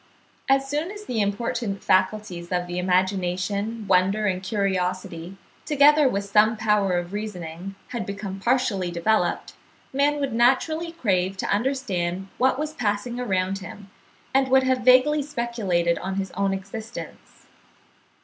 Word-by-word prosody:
As 270 0 +3
soon 300 +5 -2
as 415 +1 -9
the 230 - -1
important 205 0 -2
faculties 185 -2 0
of 180 -1 0
the 175 0 -4
imagination, 190 +4 0
wonder, 195 +3 +3
and 185 -2 0
curiosity, 185 -3 -2 0.3
together 295 -1 +5
with 200 -3 -1
some 210 +2 +3
power 210 -4 +2
of 175 +2 -4
reasoning, 190 -3 -6
had 240 -3 -3
become 200 -1 -5
partially 235 -5 +1
developed, 175 +1 0 0.4
man 290 +2 +2
would 275 -4 -2
naturally 290 +8 +2
crave 195 - 0
to - - -3
understand 195 -7 -2
what 260 +1 +3
was 305 +1 -3
passing 235 -1 -2
around 190 -4 -1
him, 195 +1 -11 0.4
and 270 0 +3
would 265 0 +4
have 260 0 +2
vaguely 255 +4 +5
speculated 220 - -1
on 190 0 -4
his 195 -1 -3
own 195 0 0
existence. 200 +4 -8
205 Hz, 140 wpm, -24 LUFS, 185-255 Hz, 0.4 s, together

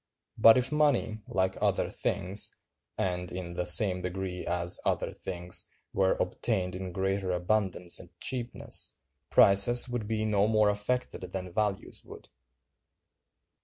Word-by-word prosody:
But 115 +2 +7
if 125 +1 +1
money, 140 -8 +1
like 95 0 -1
other - - 0
things, 95 +3 -1 0.4
and 90 -1 -2
in 90 -1 -6
the 90 0 -1
same 90 +1 +5
degree 90 0 -4
as 85 0 0
other - - -1
things, 90 -1 -3 0.3
were 95 0 +2
obtained 95 -6 -1
in 95 0 -5
greater 95 +1 -1
abundance 90 -1 0
and - - -12
cheapness, 125 -2 -1 0.4
prices 100 +6 +5
would 120 -4 -3
be 110 -1 -1
no 105 -1 +2
more 110 -1 +3
affected 115 +5 -3
than 90 -1 -6
values 105 -2 -2
would. - - -13
95 Hz, 130 wpm, -29 LUFS, 90-110 Hz, 0.4 s, But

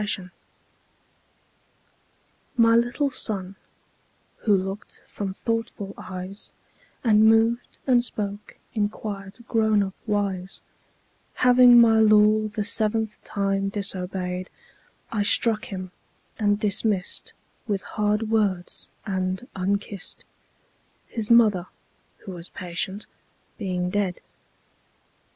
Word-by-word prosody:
The 210 - -2
Toys 185 -3 -2 2.3
MY 230 -1 +5
little 240 +4 +1
Son, 195 -6 -4 0.8
who 205 -3 +3
look'd 195 +2 -6
from 200 -2 -5
thoughtful 225 -1 -3
eyes 185 +2 -8 0.5
And 220 -2 +5
moved 225 +2 +2
and 245 -3 +4
spoke 205 -3 -5 0.2
in 210 -3 +1
quiet 205 +2 -8
grown 220 -2 +3
up 190 -1 -5
wise, 195 -3 -2 0.7
Having 250 -1 +7
my 225 -1 +6
law 215 0 +5
the 210 0 -3
seventh 220 0 -1
time 195 -1 -1
disobey'd, 185 -2 -3 0.6
I 210 - 0
struck 215 +1 +4
him, 185 -2 -6 0.5
and 205 -1 +2
dismiss'd 205 -2 -1 0.3
With 200 -3 -1
hard 210 +1 -1
words 195 -5 -1 0.2
and 190 +2 -2
unkiss'd, 200 0 -3 0.8
5 - - -26
—His 220 -2 +3
Mother, 215 -6 +5 0.6
who 195 - -6
was 175 -1 -5
patient, 185 +3 -4 0.5
being 180 -3 -2
dead. 195 -3 -1
205 Hz, 105 wpm, -24 LUFS, 190-220 Hz, 2.3 s, Having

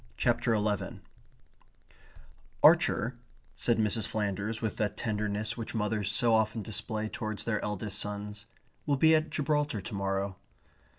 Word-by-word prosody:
CHAPTER 115 - +2
ELEVEN 105 -2 -1 1.6
"Archer," 120 +3 +5 0.4
said 120 - +2
Mrs. 110 0 +2
Flanders 105 +1 -2
with 110 -3 -3
that 105 -2 -1
tenderness 105 0 -1
which 115 0 -6
mothers 105 -1 0
so 115 +1 +3
often 110 0 +2
display 110 0 -3
towards 110 -1 -4
their 110 -2 -1
eldest 105 0 -3
sons, 105 +1 -5 0.4
"will 140 -1 +2
be 160 +3 +6
at 155 0 +3
Gibraltar 150 -5 0
to 95 - -8
morrow." 95 -1 -1
110 Hz, 130 wpm, -30 LUFS, 105-115 Hz, 1.6 s, be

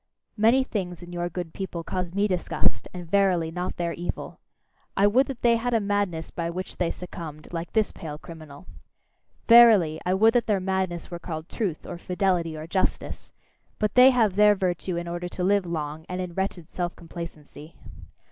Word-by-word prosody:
Many 230 +5 +4
things 180 -7 -4
in 175 0 -10
your 175 0 -2
good 175 -1 -5
people 180 -3 -5
cause 180 0 -3
me 200 +3 +1
disgust, 180 -3 -1
and 180 -1 -7
verily, 180 -3 +2
not 180 +2 -4
their 170 -1 -1
evil. 175 +1 -5 0.6
I 200 - +5
would 250 +7 +4
that 265 -3 -7
they 235 -1 +5
had 240 +1 -1
a - - +4
madness 200 -5 -1
by 170 -1 -3
which 185 +2 -6
they 175 -2 +1
succumbed, 165 -3 -8
like 165 0 -4
this 220 -2 +2
pale 150 -2 -7
criminal! 155 - -11 0.8
Verily, 215 -10 +7
I 180 +1 +1
would 220 +3 +5
that 245 - +2
their 205 -3 +2
madness 185 -2 -2
were 175 - -5
called 160 -2 -6
truth, 190 -9 -3
or 170 - -7
fidelity, 180 -3 0
or 155 - -6
justice: 185 +3 -2 0.5
but 210 -1 0
they 250 +1 +8
have 225 -7 +2
their 210 0 +6
virtue 185 -1 -1
in 170 0 -4
order 175 +1 -4
to 180 - -3
live 195 0 +2
long, 155 -1 -4
and 180 0 -3
in 180 -2 -4
wretched 190 -3 -3
self 175 -1 -3
complacency. 165 -2 -10
180 Hz, 185 wpm, -26 LUFS, 170-200 Hz, 0.8 s, they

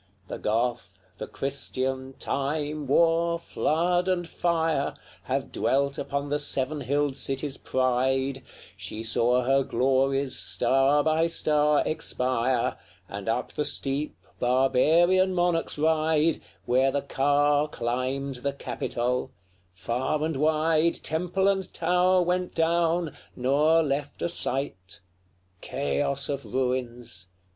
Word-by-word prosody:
LXXX. 95 +1 -35
The - - -4
Goth, 115 -2 -1 0.3
the - - -5
Christian, 130 -1 -4
Time, 145 +1 -2
War, 170 +3 +3
Flood, 175 +2 0
and 180 -2 0
Fire, 160 -5 0 0.3
Have 135 0 -2
dwelt 140 +1 0
upon 140 0 -3
the 145 +1 0
seven 145 0 0
hilled 145 0 0
city's 135 +1 -1
pride: 130 +1 0 0.3
She 110 - -6
saw 120 +2 +2
her 135 +2 +3
glories 135 +2 +1
star 135 +2 +2
by 160 +1 +2
star 150 -2 +2
expire, 125 -4 -1 0.3
And 100 +3 -5
up 120 +2 -2
the 150 - -1
steep 145 +1 -2 0.2
barbarian 160 +9 +3
monarchs 175 -3 0
ride, 155 0 +2 0.2
Where 130 +2 +3
the 140 - -1
car 145 +2 +2
climbed 130 +1 -2
the 140 +3 -2
Capitol; 125 -2 -2 0.4
far 120 +11 -2
and 160 -1 -2
wide 155 +3 +2
Temple 180 +4 0
and 195 -2 0
tower 180 +2 +2
went 180 +1 -1
down, 165 -1 +1 0.2
nor 150 +6 +3
left 145 0 -3
a - - 0
site; 125 - -4 0.6
Chaos 70 - -1
of 140 -1 -3
ruins! 120 -5 -3
140 Hz, 120 wpm, -26 LUFS, 130-160 Hz, 0.6 s, War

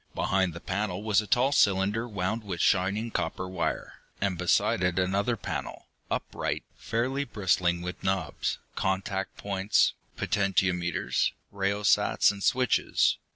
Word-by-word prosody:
Behind 95 -3 +1
the - - -6
panel 100 +1 -2
was 105 -1 +3
a 105 - -9
tall 130 +1 +3
cylinder 100 -1 +2
wound 105 +1 -2
with 95 -4 -5
shining 100 +4 +2
copper 85 0 -2
wire, 90 -2 -3 0.2
and 100 -2 0
beside 90 +1 +2
it 90 -1 +1
another 100 +6 +1
panel, - - -5 0.2
upright, - - -2
fairly 130 +5 -1
bristling 90 -7 0
with 90 +1 -6
knobs, 95 0 -1 0.2
contact 95 0 -2
points, 100 0 +2 0.2
potentiometers, 90 -4 +1 0.2
rheostats 100 +1 +3
and 100 -1 -9
switches. 130 -1 +2
95 Hz, 125 wpm, -28 LUFS, 90-105 Hz, 0.2 s, was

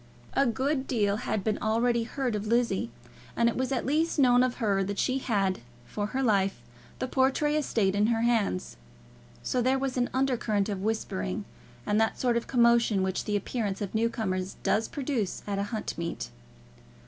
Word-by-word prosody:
A 275 - +3
good 265 +4 0
deal 205 -5 +1
had 215 -2 -2
been 215 0 0
already 230 +2 +1
heard 255 -1 -2
of 210 +1 -3
Lizzie, 230 - +1 0.5
and 235 - +3
it 235 - +1
was 260 +1 -1
at 260 - -1
least 315 +5 +1
known 250 -3 +5
of 255 -1 +1
her 200 -5 +1
that 200 +1 -3
she 260 +5 +1
had, 195 -7 0 0.3
for 205 - -3
her 260 +5 -2
life, 195 - +2 0.4
the 255 - -2
Portray 270 +4 +2
estate 225 -10 +1
in 205 +1 +2
her 225 -1 +1
hands. 225 - 0 0.7
So 250 - 0
there 260 +2 +2
was 265 -1 -2
an 245 -1 +1
undercurrent 240 -6 0
of 195 -2 -3
whispering, 210 -1 -2 0.4
and 210 +1 +2
that 220 - 0
sort 245 -2 +2
of 235 - -1
commotion 235 -5 +4
which 190 0 -1
the 210 - -1
appearance 205 -1 -2
of 200 -3 -4
new 225 +1 +2
comers 185 -5 -3
does 220 +1 +2
produce 260 -9 -2
at 200 -1 -2
a - - +1
hunt 220 -3 -3
meet. 170 - -4
225 Hz, 185 wpm, -28 LUFS, 205-255 Hz, 0.7 s, known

